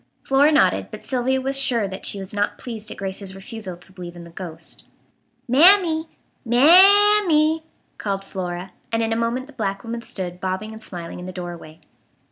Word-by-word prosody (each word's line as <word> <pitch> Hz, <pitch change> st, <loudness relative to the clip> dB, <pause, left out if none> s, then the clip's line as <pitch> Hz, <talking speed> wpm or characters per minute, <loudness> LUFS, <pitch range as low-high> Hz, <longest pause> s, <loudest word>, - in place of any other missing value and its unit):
Flora 280 Hz, +3 st, +4 dB
nodded, 300 Hz, -, +3 dB
but -, -, -9 dB
Sylvia 260 Hz, 0 st, 0 dB
was 270 Hz, +1 st, -1 dB
sure 240 Hz, -6 st, +1 dB
that 190 Hz, 0 st, -5 dB
she -, -, -1 dB
was 195 Hz, 0 st, -5 dB
not 205 Hz, 0 st, -1 dB
pleased 220 Hz, -3 st, -7 dB
at -, -, -8 dB
Grace's 195 Hz, 0 st, -5 dB
refusal 195 Hz, -2 st, -7 dB
to 175 Hz, +2 st, -15 dB
believe 175 Hz, -2 st, -9 dB
in 175 Hz, -, -10 dB
the 170 Hz, -, -13 dB
ghost. 170 Hz, -2 st, -7 dB, 0.6 s
"Mammy! 320 Hz, +3 st, +5 dB, 0.4 s
Mam 390 Hz, -, +6 dB
m -, -, -2 dB
e 310 Hz, 0 st, +4 dB
e," 320 Hz, -, -19 dB, 0.4 s
called 195 Hz, -1 st, -2 dB
Flora, 180 Hz, -1 st, -5 dB, 0.2 s
and 225 Hz, 0 st, +1 dB
in 225 Hz, 0 st, 0 dB
a -, -, 0 dB
moment 235 Hz, +3 st, -1 dB
the 295 Hz, -, -16 dB
black 195 Hz, -5 st, -3 dB
woman 235 Hz, 0 st, -5 dB
stood 180 Hz, -5 st, -5 dB
bobbing 190 Hz, +4 st, -3 dB
and 220 Hz, 0 st, -10 dB
smiling 175 Hz, -5 st, -8 dB
in 180 Hz, -, -8 dB
the -, -, -5 dB
doorway. 175 Hz, -3 st, -8 dB
220 Hz, 195 wpm, -22 LUFS, 185-270 Hz, 0.6 s, Mam